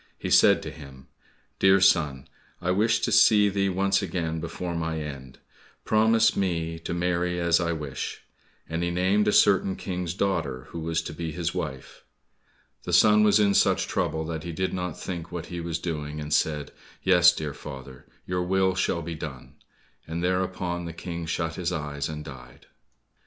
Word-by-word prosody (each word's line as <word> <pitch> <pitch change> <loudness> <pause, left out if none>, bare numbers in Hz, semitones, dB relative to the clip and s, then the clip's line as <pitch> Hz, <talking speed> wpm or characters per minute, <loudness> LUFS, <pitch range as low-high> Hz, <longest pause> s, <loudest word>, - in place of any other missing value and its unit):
He - - -5
said - - +5
to - - -6
him, 65 -3 -13 0.5
"Dear 95 0 +5
son, 75 -8 +2 0.3
I 90 +1 -1
wished 110 +4 +2
to - - +1
see 105 -2 +6
thee 100 0 0
once 95 +2 +1
again 80 -3 -3
before 85 +2 -5
my 80 -1 -2
end, 70 -4 -8 0.5
promise 110 +1 +3
me 85 -4 -1
to 80 - -5
marry 90 0 0
as 85 -1 +3
I 85 -1 0
wish," 75 -4 -5 0.4
and 80 +2 -3
he 85 - 0
named 95 +4 +1
a - - +4
certain 95 -2 +4
King's 90 -2 -4
daughter 70 -11 -1
who 85 - -6
was 80 +1 -1
to - - -6
be 80 -2 -4
his 85 -1 -2
wife. 65 -1 -6 0.8
The - - -5
son 105 0 +6
was 105 0 +5
in 100 -1 +3
such - - +3
trouble 80 0 -1
that 80 -1 -4
he 85 - -5
did 95 +3 -2
not 90 -3 -4
think 85 -2 -6
what 85 -1 -5
he 85 - -4
was 85 -1 -3
doing, 75 -3 -4
and 75 0 -4
said, 75 -2 0 0.3
"Yes, 90 -2 +6
dear 75 -4 -5
father, 65 -3 -10 0.2
your 90 0 -1
will 95 +1 +2
shall 90 -2 -1
be 85 - -5
done," 75 -5 -8 0.5
and 85 +2 -4
thereupon 90 -1 -1
the 85 - -6
King 85 0 -6
shut 85 0 -2
his 90 -1 -2
eyes, 75 -3 -3
and 75 -1 -6
died. 60 -3 -12
85 Hz, 180 wpm, -26 LUFS, 80-95 Hz, 0.8 s, see